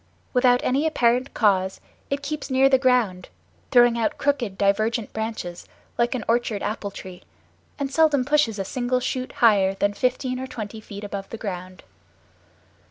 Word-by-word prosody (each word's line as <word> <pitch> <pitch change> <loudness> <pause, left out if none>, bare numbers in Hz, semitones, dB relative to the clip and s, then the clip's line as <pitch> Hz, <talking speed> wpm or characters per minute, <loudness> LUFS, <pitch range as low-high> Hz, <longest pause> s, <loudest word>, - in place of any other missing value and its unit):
Without 250 -1 +4
any 280 +5 +1
apparent 250 -3 +1
cause 190 -3 +2 0.3
it 280 +1 -2
keeps 300 +1 -4
near 265 +1 +4
the 265 -1 +4
ground, 245 -8 +1 0.4
throwing 240 -2 +5
out 225 - 0
crooked, 250 -9 -1
divergent 215 +3 0
branches 220 -6 -5 0.3
like 240 +2 +1
an 240 - -3
orchard 230 -3 0
apple 210 -1 -3
tree, 185 -2 -10 0.6
and 275 -1 -3
seldom 300 -5 +3
pushes 290 -7 +2
a 195 - -3
single 250 +3 -1
shoot 255 0 -3
higher 200 -4 +3
than 205 +1 0
fifteen 255 +2 -1
or 260 - -5
twenty 220 -2 -7
feet 205 -1 -9
above 200 -1 -6
the 230 - -6
ground. 185 -3 -7
235 Hz, 160 wpm, -24 LUFS, 205-255 Hz, 0.6 s, throwing